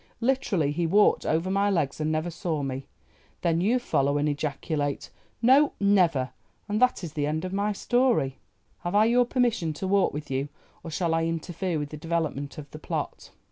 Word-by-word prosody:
Literally 230 - +1
he 165 +3 0
walked 205 +5 +3
over 165 +4 +1
my 200 +1 +2
legs 155 -6 0
and 155 0 0
never 155 +2 -1
saw 160 -3 -2
me. 135 0 -4 0.5
Then 170 -1 +1
you 225 +7 +3
follow 140 - +1
and 145 +1 +1
ejaculate, 145 0 -2 0.3
'No, 275 +4 +5
never!'—and 190 - 0
that 255 -6 +3
is 160 -4 -6
the 145 -1 -1
end 155 +3 -2
of 185 - -5
my 200 +2 0
story. 235 - +1 0.4
Have 175 +3 -3
I 210 +1 +6
your 245 +2 +4
permission 235 -10 0
to 170 - -5
walk 195 0 +3
with 150 -1 -6
you, 135 +2 -1 0.3
or 165 - -6
shall 165 +1 -1
I 165 0 +1
interfere 165 +1 -2
with 145 -1 -3
the 155 - -7
development 155 -3 -2
of 145 -2 -9
the 155 - -9
plot?" - - -4
165 Hz, 185 wpm, -26 LUFS, 150-200 Hz, 0.5 s, I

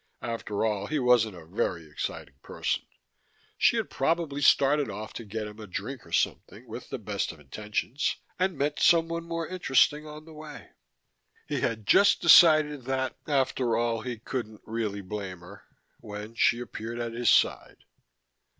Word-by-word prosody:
After 115 -3 -2
all, 105 -2 -1
he 155 - -1
wasn't 120 -6 +3
a 85 -2 -12
very 85 -1 -2
exciting 75 -2 -5
person: - - -3 0.7
she - - +3
had - - -2
probably 145 0 0
started 140 -1 +4
off 105 +2 -7
to - - -7
get 110 +1 -5
him 105 +1 -10
a 105 - -8
drink 90 - -6
or - - -16
something, - - -1
with - - -8
the - - -4
best - - -3
of 80 - -15
intentions, 105 - -2 0.2
and 185 -3 0
met 145 +2 -1
someone 165 0 +3
more 165 -1 -3
interesting 150 -3 +2
on 150 0 -10
the 160 - -13
way. 150 -1 -11 0.8
He - - -2
had 110 -2 -2
just 200 - +5
decided 155 -5 +6
that, 130 0 -1
after 130 -4 +1
all, 115 -1 0
he 120 0 -5
couldn't 110 -2 -5
really 110 -3 -3
blame 95 -2 -6
her, 95 +3 -13 0.3
when 105 +2 -8
she 115 +1 +3
appeared 120 -1 -6
at 120 -1 -4
his 120 +1 +1
side. - - +2
120 Hz, 165 wpm, -28 LUFS, 105-150 Hz, 0.8 s, decided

